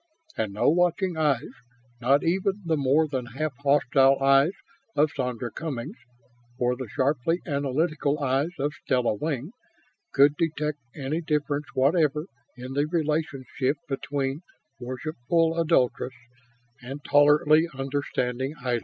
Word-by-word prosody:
And 100 Hz, -2 st, -2 dB
no 105 Hz, -, +1 dB
watching 175 Hz, +2 st, +2 dB
eyes, 150 Hz, -6 st, 0 dB, 0.5 s
not 135 Hz, +4 st, +3 dB
even 190 Hz, +4 st, 0 dB
the 165 Hz, -1 st, +1 dB
more 145 Hz, +2 st, +2 dB
than 130 Hz, -4 st, -3 dB
half 155 Hz, -1 st, -1 dB
hostile 140 Hz, -1 st, +4 dB
eyes 135 Hz, +5 st, +4 dB, 0.4 s
of 150 Hz, +1 st, +3 dB
Sandra 125 Hz, -3 st, -3 dB
Cummings 150 Hz, -, -5 dB, 0.6 s
or 125 Hz, 0 st, +1 dB
the 125 Hz, -3 st, -7 dB
sharply 145 Hz, -, 0 dB
analytical 145 Hz, +1 st, 0 dB
eyes 135 Hz, +3 st, +1 dB
of 145 Hz, +2 st, -1 dB
Stella 125 Hz, -8 st, 0 dB
Wing, 145 Hz, -, -3 dB, 0.6 s
could 145 Hz, +1 st, +5 dB
detect 150 Hz, -3 st, -1 dB, 0.2 s
any 150 Hz, +3 st, -2 dB
difference 150 Hz, -2 st, -1 dB
whatever 150 Hz, +2 st, +2 dB, 0.3 s
in 125 Hz, +1 st, -7 dB
the 145 Hz, +2 st, +1 dB
relationship 150 Hz, -4 st, -1 dB
between 135 Hz, +1 st, -2 dB, 0.4 s
worshipful 155 Hz, +6 st, -1 dB
adulatress 130 Hz, -5 st, +1 dB, 0.7 s
and 135 Hz, +4 st, -8 dB
tolerantly 150 Hz, +2 st, +5 dB
understanding 135 Hz, 0 st, -2 dB
idol. 125 Hz, -2 st, -1 dB
145 Hz, 120 wpm, -26 LUFS, 130-155 Hz, 0.7 s, could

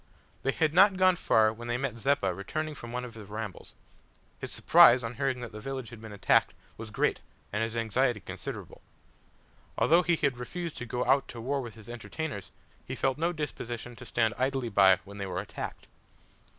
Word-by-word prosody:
They 135 Hz, -, +1 dB
had 155 Hz, +2 st, +1 dB
not 190 Hz, +2 st, +6 dB
gone 185 Hz, -1 st, +5 dB
far 110 Hz, -9 st, +3 dB
when 120 Hz, +2 st, -9 dB
they 120 Hz, 0 st, 0 dB
met 125 Hz, -3 st, -3 dB
Zeppa 135 Hz, -7 st, +1 dB
returning 155 Hz, -, -4 dB
from 120 Hz, -5 st, -9 dB
one 125 Hz, +1 st, -3 dB
of 120 Hz, -, -9 dB
his 105 Hz, -3 st, -11 dB
rambles. 105 Hz, -2 st, -7 dB, 0.6 s
His -, -, -5 dB
surprise 125 Hz, +1 st, +7 dB
on 115 Hz, +1 st, -4 dB
hearing 125 Hz, +1 st, -1 dB
that 120 Hz, -2 st, -6 dB
the 105 Hz, -, -8 dB
village 130 Hz, 0 st, -5 dB
had 115 Hz, -2 st, -11 dB
been 110 Hz, -1 st, -9 dB
attacked 100 Hz, -3 st, +2 dB, 0.2 s
was 110 Hz, 0 st, -8 dB
great 105 Hz, -, +1 dB, 0.3 s
and 105 Hz, -, 0 dB
his 115 Hz, +1 st, -2 dB
anxiety 115 Hz, +1 st, +1 dB
considerable. 85 Hz, -, -7 dB, 1.0 s
Although 170 Hz, +3 st, +5 dB
he 175 Hz, 0 st, +2 dB
had 140 Hz, -6 st, 0 dB
refused 170 Hz, +6 st, -5 dB
to 125 Hz, -, -6 dB
go 125 Hz, +2 st, -2 dB
out 135 Hz, 0 st, +3 dB
to 120 Hz, -, -8 dB
war 135 Hz, +4 st, -1 dB
with 120 Hz, -4 st, -8 dB
his 110 Hz, -1 st, -13 dB
entertainers, 120 Hz, -, -5 dB, 0.3 s
he -, -, -6 dB
felt 135 Hz, +2 st, 0 dB
no 170 Hz, +2 st, +1 dB
disposition 120 Hz, -6 st, -5 dB
to 120 Hz, -, -10 dB
stand 115 Hz, -1 st, +1 dB
idly 130 Hz, -2 st, 0 dB
by 95 Hz, -3 st, +6 dB
when 100 Hz, +1 st, -10 dB
they 100 Hz, -, -3 dB
were 90 Hz, -1 st, -3 dB
attacked. 95 Hz, -, -6 dB
120 Hz, 200 wpm, -29 LUFS, 110-140 Hz, 1.0 s, surprise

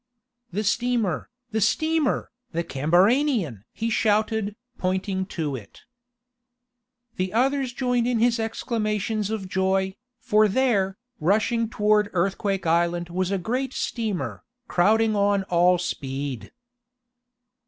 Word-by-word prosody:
"The 205 Hz, +4 st, -1 dB
steamer! 225 Hz, -3 st, 0 dB, 0.2 s
The 220 Hz, 0 st, 0 dB
steamer! 315 Hz, +7 st, +1 dB, 0.2 s
The 170 Hz, +1 st, 0 dB
CAMBARANIAN!" 175 Hz, -, +2 dB
he 230 Hz, +1 st, -3 dB
shouted, 215 Hz, -1 st, +1 dB, 0.2 s
pointing 190 Hz, +1 st, -1 dB
to 150 Hz, -4 st, -1 dB
it. 105 Hz, -6 st, -11 dB, 1.4 s
The 185 Hz, 0 st, -1 dB
others 265 Hz, +2 st, +1 dB
joined 245 Hz, -1 st, 0 dB
in 245 Hz, -1 st, +1 dB
his 235 Hz, +1 st, +2 dB
exclamations 215 Hz, -2 st, -1 dB
of 215 Hz, -4 st, -3 dB
joy, 190 Hz, +1 st, +1 dB, 0.3 s
for 215 Hz, -1 st, +4 dB
there, 205 Hz, -4 st, +1 dB, 0.2 s
rushing 220 Hz, +6 st, +1 dB
toward 210 Hz, -2 st, +2 dB
Earthquake 195 Hz, +1 st, 0 dB
Island 170 Hz, +1 st, +1 dB
was 185 Hz, +1 st, -1 dB
a 195 Hz, -, 0 dB
great 250 Hz, +8 st, -2 dB
steamer, 230 Hz, -, -3 dB, 0.3 s
crowding 215 Hz, +4 st, +3 dB
on 200 Hz, -1 st, +2 dB
all 180 Hz, +1 st, +5 dB
speed! 135 Hz, -, -4 dB
205 Hz, 110 wpm, -25 LUFS, 180-230 Hz, 1.4 s, all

